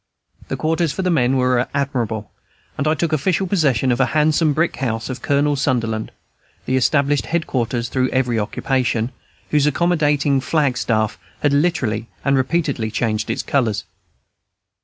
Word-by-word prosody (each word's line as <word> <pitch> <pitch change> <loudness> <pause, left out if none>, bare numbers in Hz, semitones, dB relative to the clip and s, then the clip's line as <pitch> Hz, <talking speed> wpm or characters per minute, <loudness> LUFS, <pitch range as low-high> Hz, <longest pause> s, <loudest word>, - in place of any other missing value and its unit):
The - - -3
quarters 165 0 0
for 190 - -3
the 180 - +1
men 135 -4 +2
were 125 -1 +2
admirable; 120 -7 -2 0.4
and 140 - -1
I 155 - +3
took 160 +1 -1
official 180 +6 +1
possession 140 - +2
of 120 - 0
the 130 - +3
handsome 155 +1 +3
brick 165 +4 0
house 115 -2 -2
of 125 -1 -7
Colonel 145 +1 +2
Sunder 130 -4 +1
land, 110 -1 -4 0.5
the 130 - 0
established 140 -2 +2
head 165 +1 0
quarters 120 -1 -1
through 130 -1 0
every 125 -3 +1
occupation, 120 +2 -1 0.4
whose 150 -1 +3
accommodating 150 -4 +2
flag 145 -3 +1
staff 110 -2 0 0.2
had 145 -1 +2
literally 130 -8 0 0.2
and 140 0 +3
repeatedly 135 -4 0
changed 110 0 -1
its - - -1
colors. 115 -7 0
135 Hz, 160 wpm, -20 LUFS, 120-150 Hz, 0.5 s, I